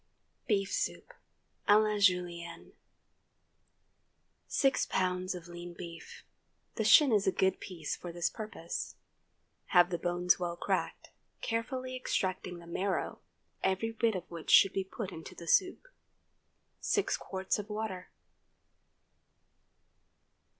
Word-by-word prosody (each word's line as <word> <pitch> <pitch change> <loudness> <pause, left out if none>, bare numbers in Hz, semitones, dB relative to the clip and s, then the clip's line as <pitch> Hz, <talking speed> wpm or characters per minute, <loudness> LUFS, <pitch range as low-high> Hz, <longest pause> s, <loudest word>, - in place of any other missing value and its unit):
BEEF 195 -3 +1
SOUP - - -2 0.6
(à 205 +1 +8
la 210 -1 +1
Julienne). 175 -3 +1
✠ - - -32 1.7
6 270 -1 +2
lbs. 185 0 0
of 175 -1 -9
lean 175 0 -8
beef. 170 -2 -9 0.5
The - - -1
shin 295 -5 +7
is 205 -2 +3
a - - +5
good 190 0 +1
piece 170 -5 -5
for 175 - -7
this 175 0 0
purpose. 210 -6 -5 0.7
Have 175 0 +5
the 175 - -1
bones 175 +1 +2
well 175 -1 -2
cracked, - - -2 0.3
carefully 255 +3 -2
extracting 185 -7 -2
the 170 - -12
marrow, 185 +3 -2 0.4
every 190 +4 +1
bit 225 -1 +1
of 180 - -3
which 165 -2 -7
should 195 - +7
be 195 - 0
put 190 +1 -6
into 160 -2 -9
the 170 - -10
soup. 370 - +2 0.9
6 405 - 0
qts. 190 +2 -2
of 210 +1 -6
water. 210 -4 -4
185 Hz, 125 wpm, -32 LUFS, 175-215 Hz, 1.7 s, à